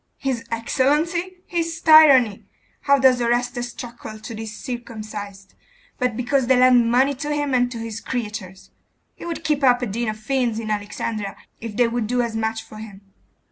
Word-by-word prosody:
'His 260 -4 -2
excellency! 315 +10 0
His 335 -1 -2
tyranny! 280 -10 +6 0.4
Why 280 0 +6
does 260 -2 +4
Orestes 240 +1 -1
truckle 235 -3 -9
to 220 +2 -9
these 220 -1 -7
circumcised, 215 -5 -7 0.5
but 250 -3 0
because 250 +1 0
they 260 0 +4
lend 250 -2 +5
money 260 +4 +3
to 295 +2 -5
him 290 -2 -1
and 245 -1 +2
to 235 - -6
his 225 -1 -6
creatures? 210 -7 -6 0.4
He - - -11
would 335 -1 -5
keep 300 -2 0
up 250 -1 +4
a - - +1
den 235 +2 -3
of 215 0 -3
fiends 240 0 -1
in 220 -1 -4
Alexandria 205 0 -4 0.2
if 225 -2 -7
they 245 -1 +4
would 230 -2 -2
do 245 +1 +1
as 230 -1 -4
much 220 0 -2
for 215 - -13
him! 210 -2 -10
240 Hz, 180 wpm, -22 LUFS, 220-265 Hz, 0.5 s, tyranny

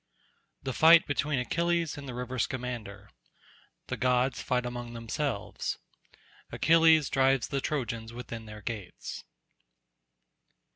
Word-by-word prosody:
The 130 - -2
fight 165 +4 +7
between 145 0 0
Achilles 170 +5 0
and 140 -2 -8
the 125 - -5
river 125 +1 -4
Scamander—The 105 - -7
gods 125 0 +1
fight 125 -1 0
among 120 -1 -5
themselves—Achilles 160 +6 0
drives 135 -2 +2
the 140 -1 -1
Trojans 115 -6 -3
within 115 -2 -7
their 105 -1 -10
gates. 105 -6 -6
125 Hz, 100 wpm, -29 LUFS, 115-140 Hz, -, fight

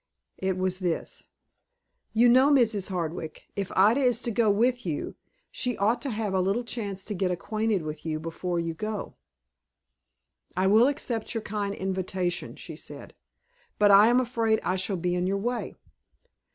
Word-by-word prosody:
It 190 -1 -1
was 185 0 -1
this. 175 -3 -2 0.9
"You 235 +2 +5
know, 260 +4 +6
Mrs. 225 -9 +3
Hardwick, 165 -3 -4
if 200 -2 -3
Ida 210 +7 +5
is 250 -3 +2
to 235 - 0
go 225 0 +2
with 245 +4 +2
you, 160 -6 -3 0.4
she 250 -2 -1
ought 215 +5 +1
to 280 - -3
have 215 -4 -2
a 190 - +2
little 200 +6 0
chance 205 -5 -5
to 210 - -3
get 190 -1 0
acquainted 215 +2 -1
with 155 0 -6
you 155 -1 -2
before 170 +2 -3
you 165 -1 -2
go." 215 +4 -4 1.4
"I 185 - +2
will 220 +6 +6
accept 240 -5 -2
your 225 - -2
kind 205 -1 -3
invitation," 185 -2 -2
she - - -9
said; - - -8 0.6
"but 205 -1 +5
I 200 +2 +8
am 245 +2 +4
afraid 230 -3 +1
I 185 - 0
shall 190 +1 -1
be 175 +1 -1
in 180 0 0
your 195 +1 0
way." 240 +4 -3
200 Hz, 170 wpm, -27 LUFS, 185-230 Hz, 1.4 s, I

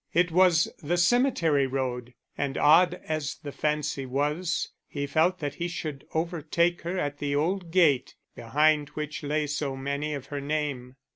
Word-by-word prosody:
It 175 0 +3
was 175 -2 +4
the 170 +4 0
cemetery 175 - +3
road, 125 -2 -3 0.2
and 140 -1 -2
odd 175 +4 +5
as 155 -3 -2
the 150 -2 -8
fancy 150 -2 -2
was, 150 +7 -1 0.2
he 140 -1 -3
felt 160 +6 +2
that 145 -5 -4
he 170 +4 -3
should 155 -5 -6
overtake 170 +1 0
her 175 +3 -3
at 145 -4 -2
the 145 -1 -1
old 175 +4 0
gate, 160 -7 +3 0.2
behind 150 +4 +2
which 150 0 -4
lay 150 +1 0
so 145 -2 -2
many 140 +3 -2
of 135 -2 -7
her 145 - -2
name. 140 -4 -3
150 Hz, 160 wpm, -27 LUFS, 140-170 Hz, 0.2 s, odd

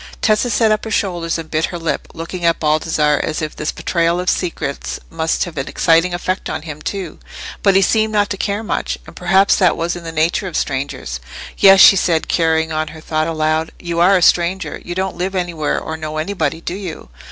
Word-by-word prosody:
Tessa 215 +3 +2
set 225 -2 +3
up 215 - +1
her 225 - -5
shoulders 175 -6 -1
and 165 -1 -8
bit 155 0 +1
her 175 - -5
lip, 165 -2 -3
looking 170 +2 -6
at 170 -1 +2
Baldassarre 150 -1 +1
as 155 - -2
if 155 -1 -4
this 150 - -2
betrayal 170 0 0
of 180 - +1
secrets 165 -6 -3
must 160 0 0
have 170 -3 -7
an 135 - -3
exciting 165 +2 +3
effect 185 +2 -3
on 155 0 -4
him 150 -2 -8
too. 190 -3 -5 0.4
But 195 -2 +3
he 195 - +5
seemed 220 +3 +2
not 205 -1 +1
to - - 0
care 200 +3 -2
much; - - -2
and - - -13
perhaps 190 +2 +3
that 180 -4 +3
was 170 +1 -1
in 175 - -8
the 165 - -6
nature 165 +5 0
of 175 - -3
strangers. 135 - -3 0.4
"Yes," 195 -1 +7
she - - +9
said, 165 -3 +1
carrying 160 -1 +1
on 155 0 -1
her 160 +1 -10
thought 155 0 -1
aloud, 155 0 -1
"you 170 -1 -4
are 185 +3 +5
a 180 - +1
stranger; 180 +3 +1
you 175 - -6
don't 190 +1 -2
live 190 +2 -2
anywhere 170 -4 -1
or 160 - -5
know 155 -1 -5
anybody, 160 -2 -2
do 170 - -4
you?" 180 - -7
170 Hz, 220 wpm, -18 LUFS, 155-190 Hz, 0.4 s, she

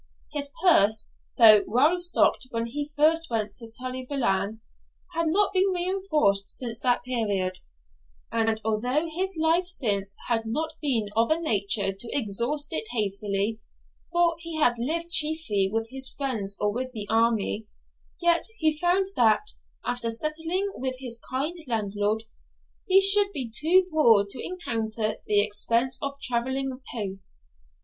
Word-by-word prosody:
His 285 -1 -3
purse, 220 - +4 0.3
though 215 -3 +8
well 290 - +3
stocked 350 -6 +1
when 230 -1 -2
he 290 +5 -5
first 325 +3 +3
went 215 -3 -2
to 230 -1 -7
Tully 255 +2 -6
Veolan, 220 -5 -1 0.5
had 335 0 0
not 395 +6 +2
been 380 +1 +3
reinforced 345 - 0
since 235 -3 -5
that 245 -2 +1
period; 205 -7 -1 0.7
and 225 -1 0
although 250 +9 +1
his 370 +3 -2
life 330 +3 +2
since 200 - -1
had 225 -2 -1
not 315 +8 -2
been 240 -8 0
of 230 +1 +2
a 315 +1 +2
nature 200 -8 0
to 230 +8 -2
exhaust 265 +7 -1
it 440 - -1
hastily, 205 0 -1 0.5
for 345 -1 +2
he 335 -1 -6
had 245 -6 +2
lived 335 +7 -2
chiefly 300 - +2
with 225 +1 -2
his 265 0 -3
friends 220 -8 -3
or 210 0 0
with 255 +2 -4
the 215 -3 -5
army, 225 -1 +1 0.5
yet 345 -1 +3
he 310 -3 +1
found 355 +3 +2
that, 235 - +3 0.3
after 245 -1 -2
settling 325 - -2
with 260 0 -3
his 245 -3 -7
kind 300 +7 -2
landlord, 210 -1 -1 0.6
he 380 0 +6
should 400 +1 +7
be 255 -7 -4
too 360 +4 +5
poor 230 -10 +4
to 200 - -4
encounter 225 - -2
the 205 -1 +4
expense 230 +5 0
of 280 0 -4
travelling 260 +2 -1 0.2
post. 195 - -4
250 Hz, 145 wpm, -26 LUFS, 220-315 Hz, 0.7 s, though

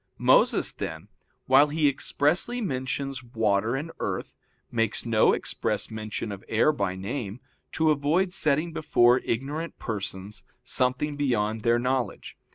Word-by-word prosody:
Moses, - - +4
then, - - -6 0.4
while 135 +3 +6
he 150 0 +1
expressly 150 - 0
mentions 135 - -3
water 110 -1 0
and 150 +5 -4
earth, - - -4 0.4
makes 115 -2 -1
no 115 -2 +4
express - - -1
mention 110 0 -4
of 100 0 -8
air 115 +7 +3
by 100 -10 -2
name, 100 +3 -5 0.3
to 160 -1 +3
avoid 155 +6 +1
setting 155 0 +1
before 125 -6 +4
ignorant 145 +9 -3
persons 100 -2 -5 0.2
something 130 +4 0
beyond 110 -6 0
their 115 +1 +3
knowledge. 125 -2 -2
130 Hz, 130 wpm, -26 LUFS, 110-145 Hz, 0.4 s, while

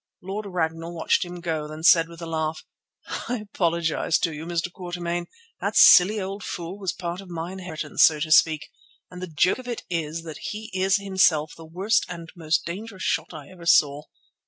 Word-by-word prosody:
Lord 200 +3 -5
Ragnall 165 -2 -3
watched 160 - +2
him 175 -1 -8
go, 160 -3 -2
then 155 +1 -9
said 165 -1 +6
with 170 0 -10
a - - -4
laugh: 160 -1 -3 0.6
"I 245 - 0
apologize 170 -6 0
to 165 - 0
you, 155 +2 -7
Mr. 175 +1 -2
Quatermain. 175 -1 -4 0.3
That - - -2
silly 205 +4 +8
old 195 +1 -5
fool 180 +3 -6
was 190 -3 -1
part 175 +1 -5
of 195 - -13
my 170 0 -5
inheritance, 180 -4 -4
so 155 -1 +6
to 155 +1 -3
speak; 155 -1 +4 0.4
and 180 0 -9
the 185 - -4
joke 170 +7 +2
of 255 - -10
it 240 -2 -4
is 165 -1 -2
that 160 -3 -8
he 215 +1 -6
is 190 +2 +2
himself 190 -6 +2
the 165 - -12
worst 190 +7 +1
and 170 -2 -8
most 165 -2 0
dangerous 190 +3 -6
shot - - -1
I 150 -2 -10
ever 175 -2 -11
saw. 145 -3 +4
170 Hz, 195 wpm, -25 LUFS, 160-190 Hz, 0.6 s, silly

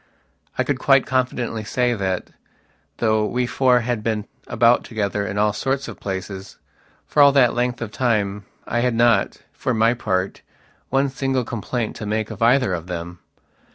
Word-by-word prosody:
I - - +2
could 140 -3 -1
quite 135 0 +4
confidently 125 -4 -1
say 125 +3 0
that, 95 -4 -2 0.7
though 110 -2 +2
we 125 +4 0
four 125 0 +3
had 120 -1 -2
been 110 -1 -2 0.2
about 120 +1 +3
together 100 -2 -2
in 100 - -4
all 105 0 +2
sorts 135 +1 -2
of 110 -5 -9
places, 95 0 -6 0.5
for 150 - +2
all 140 0 +8
that 130 -4 +5
length 120 0 -1
of 105 - -6
time, 105 -5 0 0.2
I 120 - -1
had 120 -1 +1
not, 120 0 +2
for 130 - -2
my 115 +2 +4
part, 95 -5 -2 0.5
one 135 +1 +2
single 135 -1 -1
complaint 120 0 -3
to 110 - -6
make 110 +1 -1
of - - -9
either 120 -2 +4
of 85 -1 -4
them. 85 0 -6
115 Hz, 170 wpm, -22 LUFS, 105-125 Hz, 0.7 s, all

